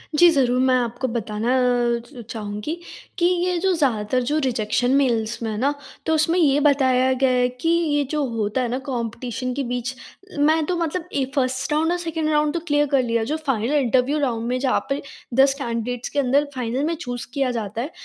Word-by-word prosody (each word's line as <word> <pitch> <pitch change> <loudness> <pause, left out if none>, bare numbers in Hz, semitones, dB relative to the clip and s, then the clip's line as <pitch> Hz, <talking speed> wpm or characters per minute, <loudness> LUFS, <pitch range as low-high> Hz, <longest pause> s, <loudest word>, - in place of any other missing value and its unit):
जी, 345 +3 +7
ज़रूर। 255 -4 +2
मैं 260 -1 +4
आपको 240 +2 -2
बताना 230 +1 -1
अ, 245 -1 +2
च 245 -1 -11
चाहूँगी 210 +8 -4 0.4
कि 345 - +2
ये 360 0 +1
जो 380 0 +2
ज़्यादातर 255 -5 +1
जो 295 +5 0
रिजेक्शन 245 0 0
मेल्स 235 -4 +1
में 225 - -1
है 210 - -4
ना, 280 +5 +1 0.3
तो 320 - +1
उसमें 330 +3 +2
ये 290 -3 +4
बताया 260 -2 +3
गया 265 0 +2
है 250 0 +3
कि 330 - +1
ये 310 -4 +2
जो 300 -1 0
होता 215 +3 0
है 245 - 0
ना 250 - -1
कॉम्पिटिशन 245 0 -3
के 275 +1 -2
बीच, 245 +1 -3 0.5
मैं 310 +1 +3
तो 365 - -1
मतलब 335 +1 -2
ए, 275 - +1
1st 255 +1 0
राउंड 320 +3 +2
और 355 - +1
2nd 325 -2 -2
राउंड 300 0 +2
तो 340 - -1
क्लियर 290 0 +3
कर 270 -2 +3
लिया। 230 -2 0
जो 315 - 0
फाइनल 240 +2 0
इंटरव्यू 260 +3 +2
राउंड 235 -4 -1
में 250 +1 0
जहाँ 260 -1 +2
पर 275 +1 -1 0.3
10 270 +2 +5
कैंडिडेट्स 235 0 -3
के 290 - -1
अंदर 280 +2 +3
फाइनल 250 +3 -2
में 335 +1 0
चूज़ 245 -4 -5
किया 270 -3 0
जाता 225 -1 -3
है, 295 +6 -5
260 Hz, 210 wpm, -22 LUFS, 240-295 Hz, 0.5 s, जी